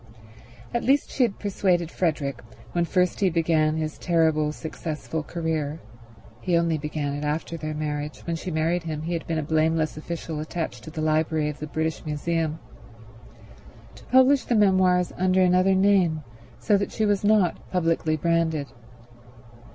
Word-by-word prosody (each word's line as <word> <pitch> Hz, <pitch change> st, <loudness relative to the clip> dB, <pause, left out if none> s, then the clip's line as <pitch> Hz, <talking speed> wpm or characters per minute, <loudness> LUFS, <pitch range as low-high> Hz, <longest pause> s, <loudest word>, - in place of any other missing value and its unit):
At 235 Hz, -, 0 dB
least 275 Hz, +3 st, +2 dB
she -, -, -2 dB
had 235 Hz, -5 st, +2 dB
persuaded 180 Hz, -4 st, 0 dB
Frederick, 150 Hz, -6 st, -1 dB, 0.3 s
when 175 Hz, -1 st, +1 dB
first 180 Hz, +1 st, +1 dB
he 195 Hz, -, +3 dB
began 160 Hz, -2 st, +2 dB
his 155 Hz, -1 st, -3 dB
terrible 160 Hz, -3 st, +2 dB
successful 160 Hz, 0 st, -5 dB
career—he 150 Hz, -, -4 dB
only 165 Hz, -2 st, +1 dB
began 145 Hz, -1 st, -3 dB
it 145 Hz, +1 st, -4 dB
after 155 Hz, +3 st, -2 dB
their 155 Hz, -1 st, -4 dB
marriage; 150 Hz, -1 st, -4 dB
when 170 Hz, -, -2 dB
she 165 Hz, -, -5 dB
married 165 Hz, +2 st, 0 dB
him 155 Hz, -2 st, -5 dB
he 170 Hz, +2 st, -3 dB
had 165 Hz, -, -4 dB
been 165 Hz, -, -1 dB
a 155 Hz, -, -1 dB
blameless 160 Hz, 0 st, +1 dB
official 160 Hz, 0 st, -5 dB
attached 155 Hz, -6 st, -4 dB
to -, -, -7 dB
the 155 Hz, 0 st, -5 dB
library 155 Hz, 0 st, +1 dB
of 150 Hz, -, -7 dB
the 150 Hz, -, -5 dB
British 160 Hz, +1 st, -2 dB
Museum—to 150 Hz, -, -7 dB
publish 260 Hz, +2 st, +5 dB
the 240 Hz, -, +1 dB
memoirs 185 Hz, -3 st, +3 dB
under 185 Hz, 0 st, +3 dB
another 185 Hz, +1 st, +4 dB
name, 185 Hz, -5 st, +3 dB, 0.3 s
so 210 Hz, -2 st, +2 dB
that 200 Hz, -, -2 dB
she 220 Hz, -, 0 dB
was 205 Hz, -1 st, +1 dB
not 205 Hz, -4 st, +3 dB
publicly 165 Hz, -3 st, +1 dB
branded. 160 Hz, -3 st, 0 dB
160 Hz, 155 wpm, -25 LUFS, 155-180 Hz, 0.3 s, publish